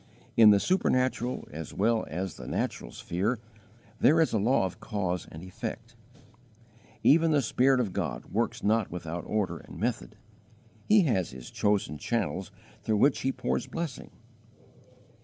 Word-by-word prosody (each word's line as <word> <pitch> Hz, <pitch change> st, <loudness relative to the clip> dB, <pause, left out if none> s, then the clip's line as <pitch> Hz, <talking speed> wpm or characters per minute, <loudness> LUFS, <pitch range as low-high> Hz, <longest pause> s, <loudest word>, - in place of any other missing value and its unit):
In 115 Hz, -3 st, +8 dB
the 100 Hz, -1 st, +6 dB
supernatural 130 Hz, -, 0 dB
as 80 Hz, +1 st, -7 dB
well 110 Hz, +2 st, +1 dB
as 90 Hz, +4 st, -3 dB
the -, -, -10 dB
natural -, -, -3 dB
sphere, 100 Hz, -, -2 dB, 0.6 s
there 155 Hz, +4 st, +5 dB
is 160 Hz, -, +2 dB
a 110 Hz, -, +2 dB
law 115 Hz, 0 st, +3 dB
of 95 Hz, +3 st, -6 dB
cause 100 Hz, -6 st, -3 dB
and 80 Hz, +2 st, -9 dB
effect. 115 Hz, +5 st, -7 dB, 1.1 s
Even 165 Hz, +3 st, +5 dB
the 150 Hz, -2 st, +3 dB
Spirit 130 Hz, +3 st, +3 dB
of 105 Hz, -7 st, -1 dB
God -, -, -3 dB
works 115 Hz, +2 st, -2 dB
not 110 Hz, 0 st, +2 dB
without 85 Hz, -1 st, -5 dB
order 105 Hz, -3 st, -1 dB
and -, -, -12 dB
method; -, -, -2 dB, 0.7 s
He 210 Hz, -1 st, +6 dB
has 110 Hz, -, +1 dB
His 65 Hz, -2 st, -10 dB
chosen 100 Hz, -8 st, 0 dB
channels 105 Hz, -4 st, -2 dB, 0.3 s
through 110 Hz, +1 st, 0 dB
which 135 Hz, +6 st, +4 dB
He 135 Hz, -, 0 dB
pours -, -, -2 dB
blessing. 165 Hz, -6 st, -5 dB
110 Hz, 150 wpm, -28 LUFS, 95-125 Hz, 1.1 s, In